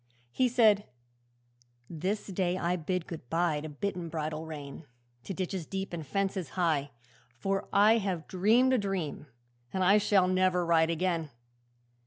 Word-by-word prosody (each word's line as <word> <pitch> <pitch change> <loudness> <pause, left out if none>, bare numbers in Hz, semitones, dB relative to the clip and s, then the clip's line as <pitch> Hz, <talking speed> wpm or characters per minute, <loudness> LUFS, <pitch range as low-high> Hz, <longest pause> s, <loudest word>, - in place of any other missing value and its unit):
He 255 - +2
said, 220 -4 +4 1.0
'This 185 +6 -3
day 185 -2 -1
I 180 -1 0
bid 180 +1 -2
good 155 -8 -9
bye 165 -3 +1
To 155 - -6
bit 190 +7 -3
and 170 -2 -5
bridle 155 0 -4
rein, 145 -1 -8 0.4
To - - -4
ditches 185 -3 -3
deep 195 -1 -4
and 165 -2 -4
fences 195 +3 -2
high, 155 -5 +1 0.4
For 195 +12 -3
I 215 +3 +5
have 185 -6 -3
dreamed 225 +8 +3
a 255 - +3
dream, 190 -7 -3 0.4
and 190 - 0
I 200 +3 +6
Shall 200 -3 +3
never 185 -1 +2
ride 165 -1 +3
again. 170 -2 -1
180 Hz, 155 wpm, -30 LUFS, 160-195 Hz, 1.0 s, I